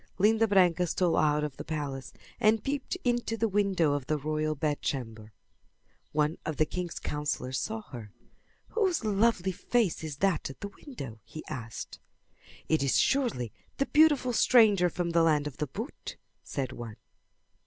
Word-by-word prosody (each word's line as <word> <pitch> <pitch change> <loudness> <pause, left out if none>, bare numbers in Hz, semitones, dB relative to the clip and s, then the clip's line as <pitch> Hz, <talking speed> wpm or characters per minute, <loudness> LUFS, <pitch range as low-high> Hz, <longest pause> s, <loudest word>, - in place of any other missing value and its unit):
Linda 220 +3 +4
Branca 180 -3 +4
stole 175 +1 +1
out 150 0 +2
of 150 -3 -4
the - - -5
palace 135 -6 -4 0.3
and 215 0 +3
peeped 280 +5 -2
into 240 -2 0
the 225 - +1
window 195 -7 +2
of 145 -2 -3
the 155 - +1
royal 155 +1 -1
bedchamber. 125 -7 -3 0.8
One 150 +2 0
of 155 - -4
the 155 - +4
king's 175 +2 -4
counsellors 145 -3 -2
saw 220 0 -3
her. 115 -6 -8 0.6
"Whose 375 - 0
lovely 205 -2 +2
face 205 -1 0
is 150 -3 -5
that 190 -5 +1
at 135 - -11
the 200 - -4
window?" 140 - -9
he 155 +7 -10
asked. 115 -3 -7 0.7
"It 160 -2 +2
is 140 -1 +2
surely 235 - +1 0.3
the 275 - +1
beautiful 295 -5 +4
stranger 210 -7 +5
from 175 0 -2
the 170 0 +4
land 155 -3 +3
of 150 -3 -6
the 150 - -2
boot," 225 - -7 0.2
said 130 -3 -4
one. 115 -4 -7
165 Hz, 160 wpm, -29 LUFS, 145-220 Hz, 0.8 s, stranger